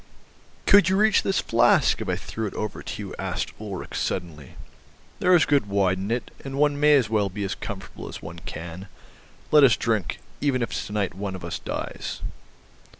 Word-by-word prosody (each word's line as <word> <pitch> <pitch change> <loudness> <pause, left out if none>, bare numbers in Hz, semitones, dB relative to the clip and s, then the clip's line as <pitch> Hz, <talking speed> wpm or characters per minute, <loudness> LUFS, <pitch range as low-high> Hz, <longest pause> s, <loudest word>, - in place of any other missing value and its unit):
"Could 195 -3 +6
you 190 - +2
reach 215 0 +4
this 195 - +1
flask 115 - +3
if - - -4
I - - +1
threw 110 -1 -4
it - - -8
over 105 -1 -4
to - - -6
you?" - - -7
asked - - -3
Ulrich 100 -4 -6
suddenly; 80 -6 -4 0.6
"there 180 0 +5
is 170 - +5
good 140 -7 +2
wine 95 -2 +1
in 95 +2 -3
it, 120 +1 -2
and 135 0 -5
one 145 0 +2
may 150 0 +6
as 130 -6 +3
well 105 -2 +1
be 100 +2 -5
as 95 - -2
comfortable 100 -3 -7
as - - -7
one 85 +1 -9
can. 85 +2 -7 0.6
Let 150 -1 +7
us 120 -6 +6
drink, 110 -6 0 0.2
even 130 -4 +1
if 115 - -3
to - - -10
night 100 -4 -1
one 95 +1 -4
of 90 -2 -7
us 85 - -4
dies." - - -5
105 Hz, 200 wpm, -25 LUFS, 95-140 Hz, 0.6 s, Let